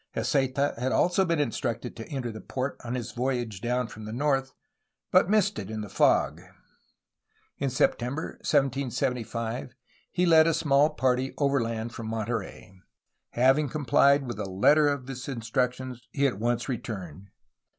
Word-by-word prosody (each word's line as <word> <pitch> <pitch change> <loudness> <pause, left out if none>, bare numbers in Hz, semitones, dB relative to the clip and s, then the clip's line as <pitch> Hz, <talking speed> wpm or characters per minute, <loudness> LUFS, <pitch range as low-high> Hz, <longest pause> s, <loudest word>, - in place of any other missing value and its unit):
Heceta 140 0 +1
had 130 +2 0
also 180 +6 +3
been 170 -2 0
instructed 120 -3 -2
to 115 - -8
enter 130 -5 -3
the 110 - -9
port 130 +1 -3
on 120 +1 -3
his 120 -2 -4
voyage 120 -4 -2
down 125 +1 0
from 110 -1 -10
the 110 - -6
north, 135 +1 0 0.6
but - - +5
missed 215 - +2
it 100 -1 -6
in 110 -1 -4
the 105 - -7
fog. 75 0 +2 1.2
In 140 - 0
September 130 +3 0
1775 125 -3 -1 0.4
he 180 - +1
led 160 -2 +6
a 165 - +2
small 145 -2 +3
party 130 -1 0
overland 120 -5 0
from 115 - -6
Monterey. 110 -3 -4 0.6
Having 135 +4 +3
com 150 +1 -4
phed 140 +3 +5
with 120 -4 -5
the 100 -2 -4
letter 145 +11 +4
of 140 -3 -1
his 130 -1 -7
instructions, 125 0 -2
he 140 0 +1
at 125 -8 0
once 120 +1 0
returned. 100 - -6
125 Hz, 155 wpm, -27 LUFS, 115-140 Hz, 1.2 s, led